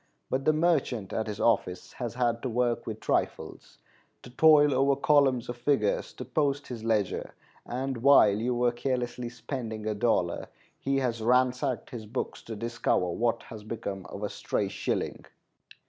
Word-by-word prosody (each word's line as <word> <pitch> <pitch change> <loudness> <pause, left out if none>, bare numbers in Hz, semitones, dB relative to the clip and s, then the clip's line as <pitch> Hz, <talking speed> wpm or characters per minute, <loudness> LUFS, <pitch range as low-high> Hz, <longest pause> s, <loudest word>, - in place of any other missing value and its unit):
But 135 +1 -1
the - - +6
merchant 155 - 0
at 110 - -1
his 105 0 -5
office 90 -6 0
has 120 -2 -5
had 120 -2 0
to 130 - -2
work 120 0 0
with 110 -1 -4
trifles, - - -2 0.5
to 125 - -11
toil 150 +1 +6
over 135 +1 +3
columns 140 -3 +3
of 120 - -5
figures 120 -4 +1
to - - -7
post 145 -2 0
his 120 -3 -6
ledger; 110 -4 -1 0.3
and 130 +1 -3
while 120 -4 +6
you 120 +4 -1
were 120 0 +2
carelessly 125 -1 -2
spending 120 -2 -6
a 110 - 0
dollar, 100 -6 0 0.3
he 135 0 0
has 120 -4 -1
ransacked 125 +2 +1
his 110 -3 -7
books 120 +5 -4
to 115 - -6
discover 115 -5 0
what 115 +6 0
has 110 -2 -10
become 100 -4 -5
of 100 - -7
a 105 - -1
stray - - -2
shilling. - - -3
120 Hz, 165 wpm, -28 LUFS, 110-135 Hz, 0.5 s, the